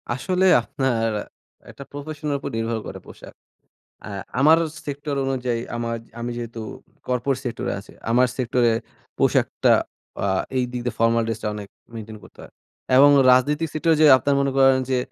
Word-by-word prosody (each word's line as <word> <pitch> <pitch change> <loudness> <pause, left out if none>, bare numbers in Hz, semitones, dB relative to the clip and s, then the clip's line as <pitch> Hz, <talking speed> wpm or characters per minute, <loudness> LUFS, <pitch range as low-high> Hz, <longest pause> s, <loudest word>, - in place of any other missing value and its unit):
আসলে 180 +10 0 0.2
আপনার 120 -2 -1 0.6
একটা 140 - -10
প্রফেশনের 145 0 -4
উপর - - -5
নির্ভর 115 0 -2
করে - - -7
পোশাক। - - -13 0.7
আ - - -6 0.3
আমার 155 +4 +6 0.3
সেক্টর 145 0 -4
অনুযায়ী 125 -3 -1 0.2
আমা 120 0 -3 0.3
আমি 120 +1 -3
যেহেতু 115 -1 -6 0.5
কর্পোরেট 125 +2 0
সেক্টরে 120 -2 -3
আছি, 100 - -16 0.2
আমার 125 +2 +4
সেক্টরে 120 -1 +2 0.5
পোশাকটা - - +2 0.5
আ - - +1 0.3
এই 130 - +2
দিক 125 - -3
দিয়ে 125 - -3
ফর্মাল 115 0 +3
ড্রেসটা 115 -1 -4
অনেক 105 -1 -7 0.3
মেইনটেইন 110 -1 -8
করতে - - -19
হয় - - -14 0.4
এবং 140 +2 +8 0.2
রাজনৈতিক 145 +5 +3
সেক্টরে 160 +1 +2
যে, - - +8
আপনারা 140 +2 0
মনে 140 -1 0
করেন 135 -1 +5
যে, 130 - +2
125 Hz, 155 wpm, -22 LUFS, 115-140 Hz, 0.7 s, এবং